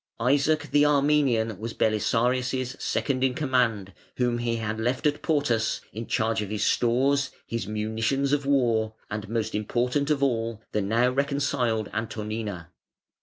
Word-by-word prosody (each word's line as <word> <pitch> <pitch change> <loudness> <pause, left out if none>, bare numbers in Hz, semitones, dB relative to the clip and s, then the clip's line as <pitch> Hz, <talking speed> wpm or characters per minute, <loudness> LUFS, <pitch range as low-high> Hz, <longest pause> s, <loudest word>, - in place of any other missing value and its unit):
Isaac 145 +5 +2
the 145 - +5
Armenian 140 -7 +2
was 115 +1 -5
Belisarius' 125 +4 +1
second 130 -2 -1
in 130 -1 +2
command, 120 -9 0 0.2
whom 120 -1 +1
he 120 -1 -1
had 110 -1 -3
left 125 +5 -1
at 150 0 +1
Portus 140 -8 +1
in 115 +1 -6
charge 110 0 0
of 105 - -4
his 105 -1 -1
stores, 135 +3 +2 0.2
his 115 -4 -4
munitions 110 +6 -1
of 145 -1 +1
war, 115 -6 +2 0.2
and 105 0 -4
most 110 -1 -2
important 125 +7 0
of 145 -2 +1
all, 115 -4 -1
the 105 - 0
now 115 +5 +2
reconciled 135 -5 0
Antonina. 105 -5 -4
120 Hz, 145 wpm, -26 LUFS, 110-140 Hz, 0.2 s, the